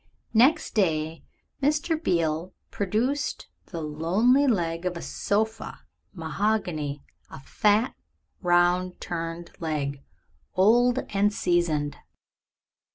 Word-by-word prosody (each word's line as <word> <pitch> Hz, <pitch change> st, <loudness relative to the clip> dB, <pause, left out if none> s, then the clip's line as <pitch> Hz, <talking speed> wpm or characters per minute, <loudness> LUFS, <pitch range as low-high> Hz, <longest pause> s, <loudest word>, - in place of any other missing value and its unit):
Next 250 Hz, +8 st, +4 dB
day 160 Hz, -5 st, 0 dB, 0.4 s
Mr. 300 Hz, +4 st, +1 dB
Beale 165 Hz, 0 st, 0 dB, 0.2 s
produced 230 Hz, +9 st, -1 dB, 0.2 s
the 170 Hz, -3 st, -6 dB
lonely 195 Hz, -, +2 dB
leg 170 Hz, -7 st, 0 dB
of 180 Hz, -1 st, -2 dB
a -, -, -6 dB
sofa 220 Hz, +2 st, -2 dB, 0.3 s
mahogany, 165 Hz, -5 st, -2 dB, 0.3 s
a -, -, -10 dB
fat 210 Hz, -, +2 dB, 0.5 s
round 180 Hz, 0 st, +2 dB
turned 165 Hz, 0 st, -5 dB
leg, 145 Hz, -4 st, -3 dB, 0.5 s
old 240 Hz, +6 st, +4 dB
and 205 Hz, +1 st, +3 dB
seasoned. 170 Hz, -7 st, 0 dB
180 Hz, 95 wpm, -26 LUFS, 165-220 Hz, 0.5 s, Next